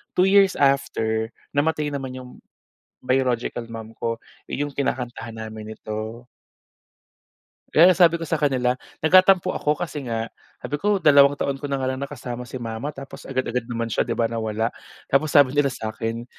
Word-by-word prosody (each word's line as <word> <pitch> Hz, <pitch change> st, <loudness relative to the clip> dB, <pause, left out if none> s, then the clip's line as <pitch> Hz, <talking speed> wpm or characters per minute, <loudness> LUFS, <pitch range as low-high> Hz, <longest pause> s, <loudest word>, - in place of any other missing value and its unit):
2 180 Hz, +1 st, +4 dB
years 195 Hz, -1 st, +5 dB
after, 110 Hz, -5 st, +1 dB, 0.3 s
namatay 150 Hz, +1 st, +1 dB
naman 135 Hz, -2 st, -4 dB
'yong 125 Hz, -1 st, -11 dB, 0.7 s
biological 125 Hz, -2 st, 0 dB
mom 115 Hz, -1 st, -7 dB
ko, 115 Hz, 0 st, -3 dB, 0.3 s
'yong 145 Hz, +1 st, -2 dB
kinakantahan 120 Hz, -4 st, -3 dB
namin 110 Hz, -1 st, -7 dB
nito. 110 Hz, +3 st, -6 dB, 1.4 s
Kaya 175 Hz, +4 st, +7 dB
sabi 170 Hz, -2 st, +5 dB
ko 165 Hz, -, -5 dB
sa 165 Hz, 0 st, -1 dB
kanila, 130 Hz, -3 st, +1 dB, 0.2 s
nagtatampo 185 Hz, +2 st, +5 dB
ako 150 Hz, 0 st, 0 dB
kasi 160 Hz, -3 st, -4 dB
nga, 115 Hz, 0 st, -3 dB, 0.2 s
sabi 145 Hz, 0 st, -5 dB
ko, 205 Hz, 0 st, +2 dB
"2 145 Hz, -5 st, +6 dB
taon 140 Hz, -1 st, -2 dB
ko 145 Hz, -, -4 dB
na 140 Hz, -, 0 dB
nga 135 Hz, -, -3 dB
lang 130 Hz, -, -5 dB
nakasama 125 Hz, -3 st, -6 dB
si -, -, -7 dB
mama, 115 Hz, +2 st, -4 dB
tapos 135 Hz, 0 st, -10 dB
agad-agad 125 Hz, -2 st, -2 dB
naman 115 Hz, -2 st, -3 dB
siya, -, -, 0 dB
'di -, -, -1 dB
ba, 115 Hz, -, +1 dB
nawala." 110 Hz, 0 st, -1 dB, 0.3 s
Tapos 140 Hz, +3 st, +1 dB
sabi 145 Hz, -3 st, +5 dB
nila 145 Hz, -1 st, +3 dB
sa'kin, 115 Hz, -1 st, -4 dB
130 Hz, 160 wpm, -23 LUFS, 115-145 Hz, 1.4 s, Kaya